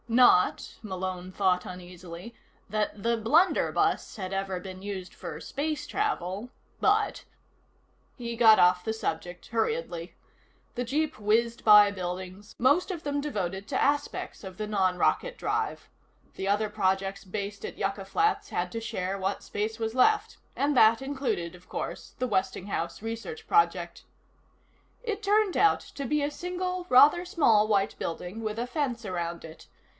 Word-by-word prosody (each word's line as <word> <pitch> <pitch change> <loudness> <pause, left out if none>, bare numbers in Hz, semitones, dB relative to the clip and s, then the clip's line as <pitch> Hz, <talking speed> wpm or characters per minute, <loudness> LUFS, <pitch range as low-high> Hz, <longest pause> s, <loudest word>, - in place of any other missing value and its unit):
Not, 235 -6 +4
Malone 185 -3 -5
thought 185 -2 +1
uneasily, 180 +3 -9 0.3
that 210 0 -2
the 235 0 +2
blunderbuss 300 - +2
had 190 -1 -4
ever 195 -1 -2
been 185 0 -9
used 195 -2 -6
for - - -7
space 300 +1 -3
travel, 235 - -2 0.3
but 420 +1 +2 0.9
He 235 -2 -4
got 225 -2 +7
off 180 0 +5
the 220 - -1
subject 180 -4 -4
hurriedly. 225 - -2 0.6
The 245 - -1
jeep 300 +5 -1
whizzed 230 +3 +1
by 210 -1 +8
buildings, 185 +2 -6
most 285 - +3
of 340 -4 -6
them 285 0 -1
devoted 195 -8 -3
to - - 0
aspects 290 -4 -1
of 190 -2 -9
the 215 - -3
non 190 -3 +1
rocket - - +1
drive. - - -2 0.5
The 190 - -4
other 205 +2 +2
projects 195 -1 -1
based 200 +1 -5
at - - -6
Yucca 195 0 -2
Flats 415 - 0
had 180 0 -2
to 230 - -3
share 195 -3 -3
what 195 +1 -2
space 215 +2 -3
was 225 +1 -2
left 425 - +3 0.2
and 285 +1 +1
that 225 0 +6
included, 265 -11 -2
of 180 - -18
course, - - -5
the 255 - 0
Westinghouse 190 -4 -2
research 230 - -6
project. 425 0 +1 1.0
It 435 -3 -3
turned 410 -1 +3
out 420 - +4 0.2
to 280 - -4
be 300 +3 +1
a 290 - -1
single, 360 +2 -3
rather 290 +7 +7
small 225 -12 +3
white 200 -2 +1
building 180 +6 -5
with 215 -1 -3
a 240 - -2
fence 245 -4 -2
around 170 -3 -4
it. 160 0 -12
215 Hz, 150 wpm, -28 LUFS, 190-285 Hz, 1.0 s, by